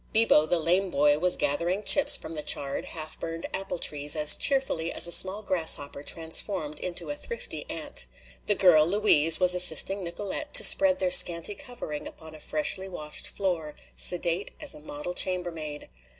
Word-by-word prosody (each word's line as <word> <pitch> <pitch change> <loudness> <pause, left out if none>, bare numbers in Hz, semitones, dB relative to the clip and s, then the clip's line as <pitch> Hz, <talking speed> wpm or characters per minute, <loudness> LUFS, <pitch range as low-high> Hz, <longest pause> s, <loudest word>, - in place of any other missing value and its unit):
Bibo, 220 -9 +3
the 175 +2 0
lame 180 +4 0
boy, 145 -1 +1
was 180 +2 +1
gathering 175 +8 -2
chips 285 - +5
from 160 - -10
the 155 - -5
charred, 140 -2 -3
half 155 -1 -9
burned 165 0 -7
apple 195 -1 -4
trees 145 -2 +1
as 150 -1 +3
cheerfully 265 - -1
as - - +2
a - - -6
small 190 +5 +4
grasshopper 160 -7 -2
transformed 160 0 -3
into 180 +9 -6
a - - -5
thrifty 470 +7 -7
ant. - - -3 0.4
The 205 - +1
girl, 165 -5 +4
Louise, 170 -5 +4
was 180 -1 +4
assisting 180 +2 +3
Nicolete 185 +3 -6
to - - +8
spread 285 -1 +6
their 185 -1 -2
scanty 170 +3 +4
covering 240 - -9
upon 160 -1 -13
a 155 - -14
freshly 190 +6 -3
washed 150 -4 -4
floor, 170 -6 -5 0.2
sedate 175 +1 -2
as 300 -2 -4
a 300 - -12
model 290 -9 -8
chambermaid. 165 -6 -3
175 Hz, 170 wpm, -25 LUFS, 155-195 Hz, 0.4 s, to